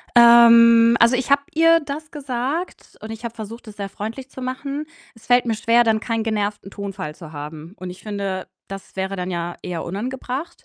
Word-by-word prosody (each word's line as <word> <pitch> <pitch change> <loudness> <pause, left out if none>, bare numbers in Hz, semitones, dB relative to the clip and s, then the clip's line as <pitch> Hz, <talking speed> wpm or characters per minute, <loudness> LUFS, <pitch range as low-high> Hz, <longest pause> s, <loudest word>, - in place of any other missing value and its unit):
Ähm, 235 0 +8
also, 235 +2 +5
ich 260 +2 -3
habe 280 0 +4
ihr 330 +1 +5
das 300 +2 -7
gesagt 280 +4 -4
und 220 - -7
ich 225 +1 -8
habe 235 -1 -5
versucht, 230 +1 -9
es 210 - -11
sehr 200 -1 -4
freundlich 225 +7 -7
zu - - -10
machen. 275 +4 -4 0.3
Es 225 - -19
fällt 245 0 +4
mir 225 - +1
schwer, 230 +2 +3
dann 220 -1 +2
keinen 225 0 -2
genervten 210 -2 -2
Tonfall 195 -6 -6
zu 160 -1 -12
haben 155 +4 -8
und 185 -1 -6
ich 180 - -12
finde, 200 -3 -4 0.2
das 195 0 -10
wäre 190 +1 -3
dann 180 0 -4
ja 175 -1 -4
eher 175 -3 -4
unangebracht, 255 - -5
225 Hz, 195 wpm, -21 LUFS, 195-255 Hz, 0.3 s, Ähm